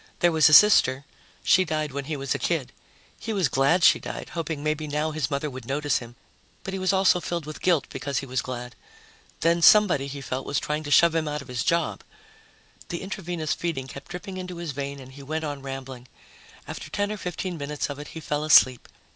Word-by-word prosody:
There 175 Hz, -, +4 dB
was 160 Hz, -1 st, +5 dB
a -, -, +2 dB
sister: 140 Hz, -9 st, +6 dB, 0.4 s
she 185 Hz, -, +5 dB
died 155 Hz, -3 st, -2 dB
when 140 Hz, +1 st, -5 dB
he 155 Hz, 0 st, -3 dB
was 135 Hz, -1 st, -2 dB
a -, -, -3 dB
kid. 145 Hz, -7 st, -1 dB, 0.5 s
He 225 Hz, -, -4 dB
was 190 Hz, -6 st, +2 dB
glad 145 Hz, +7 st, +2 dB
she -, -, +6 dB
died, -, -, -7 dB
hoping 160 Hz, -3 st, -4 dB
maybe 155 Hz, 0 st, -1 dB
now 150 Hz, +2 st, -1 dB
his 155 Hz, -4 st, -2 dB
mother 140 Hz, +1 st, -2 dB
would 130 Hz, -2 st, -8 dB
notice 145 Hz, +2 st, 0 dB
him, 120 Hz, -1 st, -11 dB, 0.5 s
but 195 Hz, -, -5 dB
he 195 Hz, -, -3 dB
was 185 Hz, 0 st, +1 dB
also 190 Hz, -2 st, +4 dB
filled 170 Hz, -2 st, -4 dB
with 155 Hz, 0 st, -8 dB
guilt 175 Hz, -6 st, +2 dB
because 140 Hz, +1 st, -3 dB
he 135 Hz, -, -2 dB
was 130 Hz, -2 st, -2 dB
glad. 125 Hz, -1 st, -6 dB, 0.7 s
Then 170 Hz, +1 st, +2 dB
somebody, 175 Hz, -8 st, +6 dB
he 140 Hz, +1 st, -6 dB
felt, 130 Hz, -1 st, -5 dB
was 140 Hz, -, 0 dB
trying 150 Hz, +1 st, -2 dB
to -, -, -5 dB
shove 170 Hz, +3 st, +5 dB
him 160 Hz, -1 st, 0 dB
out 150 Hz, -1 st, -3 dB
of -, -, -18 dB
his 125 Hz, -2 st, -2 dB
job. 170 Hz, 0 st, 0 dB, 0.9 s
The 170 Hz, -, -4 dB
intravenous 175 Hz, -5 st, -3 dB
feeding 160 Hz, -7 st, -3 dB
kept 135 Hz, +1 st, -11 dB
dripping 185 Hz, +2 st, -7 dB
into 180 Hz, -1 st, -6 dB
his 170 Hz, -3 st, -4 dB
vein 140 Hz, +1 st, -5 dB
and 130 Hz, -1 st, -12 dB
he 140 Hz, +1 st, -12 dB
went 155 Hz, +3 st, -4 dB
on 145 Hz, -2 st, -5 dB
rambling. 135 Hz, -2 st, -7 dB, 0.6 s
After -, -, -7 dB
ten 205 Hz, 0 st, -1 dB
or 215 Hz, -, -4 dB
fifteen 180 Hz, 0 st, -4 dB
minutes 145 Hz, +1 st, -3 dB
of 145 Hz, -1 st, -7 dB
it, 150 Hz, -, -8 dB
he 160 Hz, -, -8 dB
fell 150 Hz, -1 st, -2 dB
asleep. 130 Hz, -5 st, +5 dB
150 Hz, 220 wpm, -25 LUFS, 140-170 Hz, 0.9 s, sister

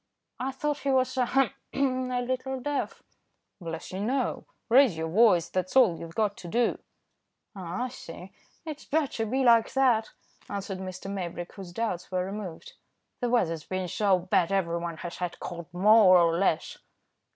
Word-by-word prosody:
"I 255 Hz, -, -1 dB
thought 290 Hz, +2 st, -2 dB
he 280 Hz, -, -2 dB
was, 255 Hz, -1 st, +2 dB
ahem! 260 Hz, +1 st, +2 dB, 0.2 s
a 255 Hz, -2 st, 0 dB
little 255 Hz, +1 st, -3 dB
deaf." 290 Hz, +2 st, -3 dB, 0.6 s
"Bless 165 Hz, -2 st, -6 dB
you 190 Hz, -, -5 dB
no, 250 Hz, +5 st, -1 dB, 0.2 s
raise 240 Hz, -, +5 dB
your 160 Hz, 0 st, -2 dB
voice, 180 Hz, -3 st, +4 dB
that's 185 Hz, +3 st, -3 dB
all 230 Hz, -11 st, +5 dB
you've 165 Hz, 0 st, -9 dB
got 210 Hz, -2 st, +1 dB
to 175 Hz, -, -9 dB
do." 235 Hz, +7 st, +1 dB, 0.8 s
"Ah! 185 Hz, +4 st, -4 dB
I 255 Hz, -, -2 dB
see. 185 Hz, -6 st, -10 dB, 0.3 s
It's 305 Hz, -2 st, -7 dB
bad 300 Hz, -2 st, 0 dB
to 225 Hz, -1 st, -2 dB
be 265 Hz, +4 st, 0 dB
like 230 Hz, -2 st, +5 dB
that," 250 Hz, -5 st, +3 dB, 0.4 s
answered 195 Hz, -1 st, -4 dB
Mr. 185 Hz, 0 st, -7 dB
Maybrick, 175 Hz, -3 st, -5 dB
whose 190 Hz, -3 st, -9 dB
doubts 185 Hz, -3 st, -3 dB
were 185 Hz, 0 st, 0 dB
removed. 195 Hz, -4 st, -7 dB, 0.5 s
"The 245 Hz, -, -1 dB
weather's 165 Hz, -10 st, +1 dB
been 185 Hz, -1 st, -3 dB
so 195 Hz, +2 st, +2 dB
bad, 180 Hz, 0 st, +1 dB
everyone 170 Hz, -3 st, -1 dB
has 175 Hz, +1 st, -7 dB
had 180 Hz, -1 st, -4 dB
cold 170 Hz, -1 st, -7 dB
more 190 Hz, +1 st, +6 dB
or 170 Hz, -1 st, +4 dB
less." 170 Hz, -3 st, 0 dB
200 Hz, 165 wpm, -28 LUFS, 175-255 Hz, 0.8 s, more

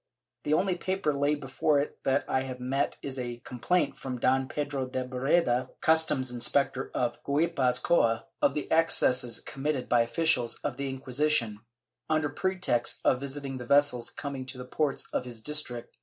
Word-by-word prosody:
The 150 Hz, -, +3 dB
only 190 Hz, +3 st, +2 dB
paper 185 Hz, -3 st, -1 dB
laid 145 Hz, +1 st, +1 dB
before 140 Hz, +2 st, +1 dB
it 145 Hz, -, -3 dB
that 135 Hz, +1 st, +2 dB
I 130 Hz, -, +1 dB
have 130 Hz, -1 st, -6 dB
met 135 Hz, +3 st, -1 dB
is 135 Hz, -1 st, -4 dB
a 120 Hz, -1 st, -4 dB
com 125 Hz, -, -8 dB
plaint 175 Hz, +4 st, +1 dB
from 130 Hz, -2 st, -5 dB
Don 130 Hz, +2 st, +2 dB
Pedro 145 Hz, -2 st, -3 dB
de 130 Hz, 0 st, -2 dB
Barreda, 130 Hz, 0 st, +1 dB
customs 160 Hz, -5 st, +3 dB
inspector 130 Hz, +2 st, 0 dB
of 120 Hz, -1 st, -1 dB
Guipuz 140 Hz, -4 st, +1 dB
coa, 115 Hz, -9 st, +2 dB, 0.2 s
of 140 Hz, -, +3 dB
the 150 Hz, -, -2 dB
excesses 125 Hz, -7 st, +3 dB
committed 135 Hz, -2 st, -3 dB
by 120 Hz, -1 st, +4 dB
officials 120 Hz, -1 st, +1 dB
of 140 Hz, -4 st, -2 dB
the 140 Hz, -1 st, -3 dB
Inquisition, 130 Hz, -4 st, 0 dB, 0.5 s
under 155 Hz, -1 st, +1 dB
pretext 180 Hz, -7 st, 0 dB
of 125 Hz, -, +4 dB
visiting 135 Hz, -1 st, -5 dB
the 120 Hz, -, -8 dB
vessels 140 Hz, -4 st, +4 dB
coming 135 Hz, -3 st, -6 dB
to 130 Hz, 0 st, -7 dB
the 125 Hz, -, -7 dB
ports 140 Hz, +2 st, -1 dB
of -, -, 0 dB
his 120 Hz, -2 st, -7 dB
district.' 125 Hz, -3 st, -4 dB
135 Hz, 170 wpm, -29 LUFS, 125-150 Hz, 0.5 s, by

